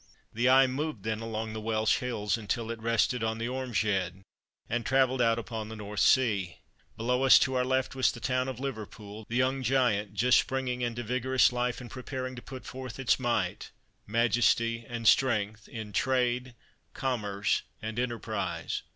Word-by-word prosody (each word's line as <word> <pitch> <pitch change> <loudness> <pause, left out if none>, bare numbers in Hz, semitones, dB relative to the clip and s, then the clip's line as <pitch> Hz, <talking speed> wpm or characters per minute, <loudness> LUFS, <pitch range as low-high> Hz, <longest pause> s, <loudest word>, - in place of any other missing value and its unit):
The 120 +3 +2
eye 135 +1 +7
moved 130 -4 -3
then 110 0 -2
along 110 -1 -4
the 110 - -5
Welsh 110 0 +1
hills 105 -5 -1
until 115 +1 -3
it 115 -1 -7
rested 115 +1 +1
on 110 0 -1
the 115 +1 -3
Ormeshead 105 -8 -1 0.4
and 120 0 -1
travelled 130 +1 +2
out 115 -1 +3
upon 110 -2 -5
the 110 - -7
North 105 -1 -6
sea. 100 -9 +3 0.4
Below 125 +3 0
us, 135 -1 +8
to 130 - +2
our 125 -1 +2
left, 130 0 0
was 130 -1 +2
the - - -9
town 130 +2 0
of 130 -2 -5
Liverpool, 110 -5 -7
the 115 - -3
young 130 +2 +1
giant 120 -5 +1
just 125 +4 +5
springing 130 -2 -2
into 120 0 -2
vigorous 130 +2 +2
life 125 0 -1
and 125 -2 -10
preparing 130 0 -5
to 125 - -8
put 130 -2 -9
forth 130 -2 -7
its 135 -1 +2
might, 115 -7 -1 0.4
majesty 115 +1 +2
and 115 -2 -2
strength, 110 -5 +2
in 110 -3 -7
Trade, 125 0 0 0.4
Commerce, 105 -6 0 0.2
and 110 +1 -4
Enterprise. 120 -3 -3
120 Hz, 170 wpm, -29 LUFS, 110-130 Hz, 0.4 s, us